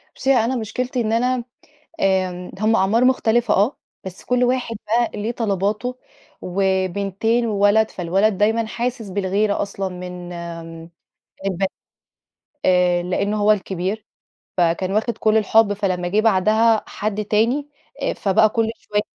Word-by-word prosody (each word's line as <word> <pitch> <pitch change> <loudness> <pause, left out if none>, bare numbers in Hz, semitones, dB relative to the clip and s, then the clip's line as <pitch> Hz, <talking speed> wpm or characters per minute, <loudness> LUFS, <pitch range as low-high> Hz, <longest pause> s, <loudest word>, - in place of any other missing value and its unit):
بُصي 270 +1 +2
أنا 245 +1 +2
مشكلتي 250 +2 -2
إن 220 - -1
أنا 250 +1 +1 0.6
آمم، 185 -2 0
هم 220 +2 +2
أعمار 220 +6 +3
مختلفة 240 -2 +2
آه، 210 +8 +2 0.3
بس 190 0 -9
كل 250 0 +2
واحد 245 -2 -1
بقى 235 +2 +1
ليه 230 +3 -1
طلباته، 215 +3 -1 0.4
وبِنتين 195 +4 0
وولد 210 +1 +3
فالولد 190 +3 0
دايمًا 220 +2 +2
حاسس 235 0 -3
بالغيرة 200 +2 0
أصلًا 195 -1 -3
من 180 -1 -8
آآ 165 -1 -8 0.6
البن 195 0 0 1.0
آآ 180 -1 +3
لأن 200 +4 -1
هو 210 0 +4
الكبير. 195 +1 -3 0.5
فكان 175 +2 +1
واخد 220 +3 -1
كل 215 0 +2
الحب، 220 0 +4
فلما 185 -3 -1
جه 210 +4 +2
بعدها 220 +2 +3
حد 210 0 -3
تاني، 235 +8 +1 0.3
آآ - - 0
فبقى 205 +2 +3
كل 225 +1 0
شوية 210 0 -2
210 Hz, 135 wpm, -21 LUFS, 190-225 Hz, 1.0 s, هو